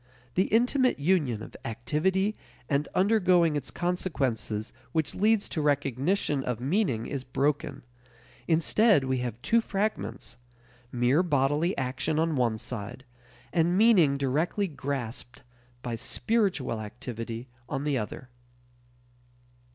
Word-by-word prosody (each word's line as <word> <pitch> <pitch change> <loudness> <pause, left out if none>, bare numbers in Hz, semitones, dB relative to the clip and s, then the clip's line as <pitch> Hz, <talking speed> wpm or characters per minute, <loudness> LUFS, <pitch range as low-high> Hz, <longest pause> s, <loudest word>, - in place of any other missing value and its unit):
The 185 - +2
intimate 250 +3 +2
union 145 - +1
of - - -11
activity 185 - 0 0.3
and 145 0 0
undergoing 185 -5 +4
its 145 -3 -3
consequences 135 - -2 0.2
which 160 -3 0
leads 215 +1 +2
to 155 - -2
recognition 145 - 0
of 125 -3 -2
meaning 135 - 0
is 140 -3 -4
broken; 140 +2 -1 0.6
instead 170 - +4
we 130 0 0
have 120 -2 -4
two 230 +1 +3
fragments: 195 - -3 0.5
mere 125 +6 +3
bodily 150 +1 +1
action 135 +3 -1
on 160 0 +1
one 120 -4 +1
side, 120 +2 -6 0.5
and 170 +1 +2
meaning 190 -11 +5
directly 155 +9 0
grasped 130 -6 -5 0.4
by 120 - -3
"spiritual" 130 - 0
activity 115 +2 -6 0.2
on 135 -1 -2
the 145 -3 +1
other. 120 +4 -6
145 Hz, 115 wpm, -28 LUFS, 125-180 Hz, 0.6 s, meaning